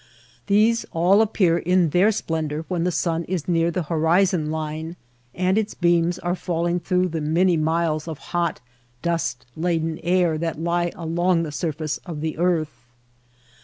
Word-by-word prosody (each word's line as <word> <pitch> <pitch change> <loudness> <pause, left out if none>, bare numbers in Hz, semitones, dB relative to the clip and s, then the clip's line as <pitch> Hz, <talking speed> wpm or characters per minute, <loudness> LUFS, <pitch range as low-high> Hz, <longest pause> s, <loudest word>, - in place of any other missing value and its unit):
These 215 +3 +3
all 180 +5 +4
appear 185 -6 +2
in 180 -2 +2
their 185 +7 +4
splendor 160 -5 -3
when 175 -2 -1
the 180 - +1
sun 165 -1 -1
is 180 -4 -3
near 170 -1 +2
the 175 +1 -2
horizon 165 +1 +2
line 160 +1 -4 0.4
and 185 +3 +2
its 215 - -3
beams 170 0 +2
are 175 0 -2
falling 175 -1 -1
through 180 +1 0
the 160 -1 -3
many 170 +4 +2
miles 160 0 0
of 160 -3 -5 0.2
hot, 170 -2 0 0.4
dust 165 -7 -1
laden 165 -1 -1
air 175 -2 +2
that 165 -2 -3
lie 170 +1 0
along 170 +1 +1
the 155 - -4
surface 155 -1 -3
of 165 -5 -6
the 155 0 -3
earth. 160 -8 -1
170 Hz, 160 wpm, -23 LUFS, 160-180 Hz, 0.4 s, all